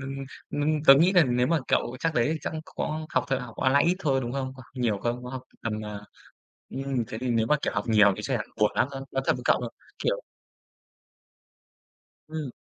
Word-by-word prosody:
nưng 135 0 -5 0.3
ninh 150 +1 0
tớ 135 - +11
nghĩ 170 +7 +4
là 180 -5 +6
nếu 125 0 +2
mà 165 0 +2
cậu 125 - +1
chắc 165 -1 0
đấy 120 +3 +3
thì 160 - -3
chắc - - -4 0.2
có 155 +1 -2
học - - +1
thật 135 -1 +1
học 125 -4 -9
online 135 +2 +3
ít 175 +2 +3
thôi, 135 -8 +1
đúng 120 -1 -4
không? 130 -1 -3
Có 130 - -12
học - - -24
nhiều 115 -5 0
không? 120 +4 -2
Có 125 - -6
học 130 0 -6 0.2
tầm 110 -1 -3
à 105 -1 -6 0.7
ừm, 135 -3 -2
thế 110 - -6
thì 125 +1 -3
nếu 115 -1 +2
mà, 150 - +4
kiểu, - - 0
học - - -1
nhiều 105 -2 +6
thì - - -6
chắc - - -1
chắn - - -4
buồn 105 - +5
lắm, - - +2
tớ 135 -1 -6
nói 135 - 0
thật - - +5
với 125 - -8
cậu, - - +4
ờ, 120 - -3 0.3
kiểu - - 0 2.1
Ừm 155 -4 -4
130 Hz, 235 wpm, -27 LUFS, 120-150 Hz, 2.1 s, tớ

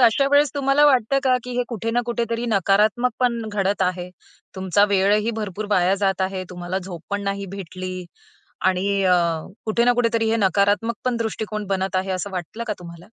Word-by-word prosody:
अशा 245 +3 +4
वेळेस 285 0 +4
तुम्हाला 280 +1 +3
वाटतं 270 -1 +3
का, 255 -1 +4
की 250 - -7
हे 245 - +2
कुठे 230 -1 -3
ना 240 +1 +2
कुठेतरी 235 0 -2
नकारात्मक 215 +4 +2
पण 240 -2 +1
घडत 200 -1 0
आहे, 180 0 -1 0.5
तुमचा 190 +2 +3
वेळही 205 +3 +2
भरपूर 210 -1 -4
वाया 185 -1 +3
जात 195 -1 0
आहे, 190 0 -2
तुम्हाला 180 +1 -4
झोप 180 -3 -8
पण 200 0 -1
नाही 200 0 -3
भेटली 185 -1 -6 0.6
आणि 195 +2 +1
अ, 180 -1 +5 0.5
कुठे 225 +2 +2
ना 245 - +5
कुठेतरी 230 -2 +1
हे 225 - +2
नकारात्मक 205 +2 +2
पण 250 -1 0
दृष्टिकोन 220 -2 -3
बनत 190 -1 -1
आहे, 190 +1 -1
असं 185 +2 -3
वाटलं 185 +5 -5
का 215 - -1
तुम्हाला? 170 -1 -11
205 Hz, 180 wpm, -22 LUFS, 190-230 Hz, 0.6 s, अ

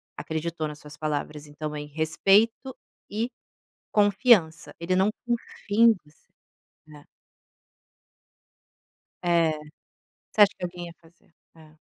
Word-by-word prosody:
acreditou 160 0 -3
nas 150 0 -9
suas 150 0 -12
palavras, 150 -1 -3
então 150 +1 -6
aí 150 0 -5
respeito 195 - +2 0.3
e 220 +4 -2 0.6
confianç. 205 -5 +3
Ele 170 +2 0
não 190 +3 +3 0.2
confia 230 -2 -1
em 230 - +8
você, 150 0 -26 0.6
né. 150 -1 -15 2.2
É, 170 -2 +3 0.8
você 215 - +1
acha 205 -1 +8
que - - -10
alguém 175 0 -7
ia 170 - -11
fazer 165 0 -25 0.2
É. 155 -1 -18
170 Hz, 115 wpm, -26 LUFS, 155-205 Hz, 2.2 s, em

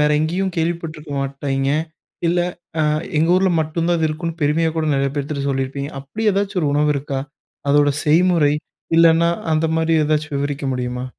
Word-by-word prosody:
வேறு 150 0 +3
எங்கேயும் 180 +4 -1
கேள்விப்பட்டுருக்க 165 -2 -3
மாட்டீங்க, 135 0 -1 0.6
இல்ல 175 +1 +2 0.4
அ - - +3 0.4
எங்க 165 +2 +2
ஊர்ல 190 0 +3
மட்டும் 160 +2 -1
தான் 175 - +3
அது 160 - +2
இருக்கும்னு 165 +2 -4
பெருமையா 160 +3 +2
கூட 160 -1 0
நெறைய 135 0 +1
பேர்த்துகிட்ட 140 0 -2
சொல்லியிருப்பீங்க. 140 +1 -3
அப்டி 150 +12 -6
எதாச்சும் 195 -1 -1
ஒரு 145 - +2
உணவு 150 0 +3
இருக்கா? 135 -1 -3 0.5
அதோட 145 0 +4 0.2
செய்முறை, 160 -1 +4 0.5
இல்லனா 165 0 +5 0.2
அந்த 160 +1 +1
மாரி 165 0 +1
எதாச்சும் 150 -1 0
விவரிக்க 145 0 -3
முடியுமா? 125 0 -3
155 Hz, 160 wpm, -20 LUFS, 140-165 Hz, 0.6 s, இல்லனா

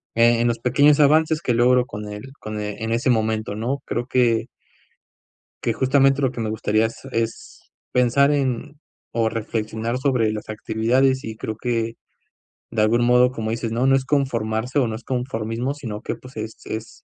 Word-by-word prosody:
eh, 115 0 +4
en 120 - +2
los 115 - 0
pequeños 140 +5 +4
avances 155 +2 +4
que 125 - 0
logro 125 +1 +4
con 105 -3 -7
el 105 +6 -8
con 110 0 -5
e 105 0 -5
en 110 - -2
ese 120 +3 +1
momento, 110 -2 0
¿no? 120 +6 -2
Creo 120 +1 -3
que 120 -3 +2 1.2
que, 115 - +1
justamente. 135 +2 +3
lo 130 - +2
que 120 - -6
me 110 -1 -2
gustaría 110 0 +1
es 115 - -10
es 115 0 -3 0.3
pensar 125 +3 +4
en 140 0 -1 0.4
o 115 -1 +3
reflexionar 110 +1 -3
sobre 125 -5 +1
las 105 0 -6
actividades. 120 +5 +1
Y 110 -1 -6
creo 110 - -5
que 115 -1 -2 0.8
de 115 -2 0
algún 115 +3 +3
modo, 125 +1 +5
como 110 -3 -3
dices, 115 0 -3
¿no?, 120 +4 +1
no 135 - +5
es 135 - +1
conformarse 125 -3 -1
o 125 - +2
no 110 - -3
es 115 - -9
conformismo, 125 0 -2
sino 115 -7 -6
que, - - -3
pues, 130 -3 -14
es 110 +1 -5
es 110 +1 -7
115 Hz, 185 wpm, -22 LUFS, 110-130 Hz, 1.2 s, modo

